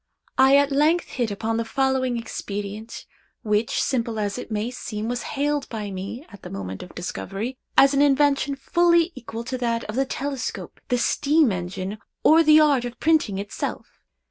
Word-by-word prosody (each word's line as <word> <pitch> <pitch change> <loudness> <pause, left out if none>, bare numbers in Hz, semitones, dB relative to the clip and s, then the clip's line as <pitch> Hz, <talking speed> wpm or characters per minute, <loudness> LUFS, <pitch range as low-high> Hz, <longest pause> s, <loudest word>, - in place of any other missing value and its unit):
I 265 +1 +7
at 285 0 +3
length 305 +5 +2
hit 240 -4 -1
upon 220 +2 -2
the 230 - 0
following 260 0 0
expedient, 210 -1 -6 0.4
which, 210 0 +1
simple 235 -3 -1
as 205 +2 -2
it - - -8
may 215 +2 -2
seem, 220 -3 -5
was 240 0 -2 0.2
hailed 290 0 0
by 210 -3 -5
me, 195 - -6
at 200 - -13
the - - -9
moment 95 -1 -6
of 180 - -11
discovery, 195 +7 -4 0.2
as 275 +1 +7
an 280 - +3
invention 285 0 +3
fully 340 +4 +3
equal 230 -5 -7
to 255 +2 -4
that 235 -1 0
of 215 - -6
the 270 +1 +2
telescope, 270 -4 -4
the 250 - +1
steam 290 +2 +3
engine, 185 +3 -4 0.2
or 320 +1 +7
the 310 -1 +7
art 290 -5 +4
of 245 0 -6
printing 310 -11 +2
itself. 200 +1 -5
245 Hz, 175 wpm, -24 LUFS, 210-280 Hz, 0.4 s, I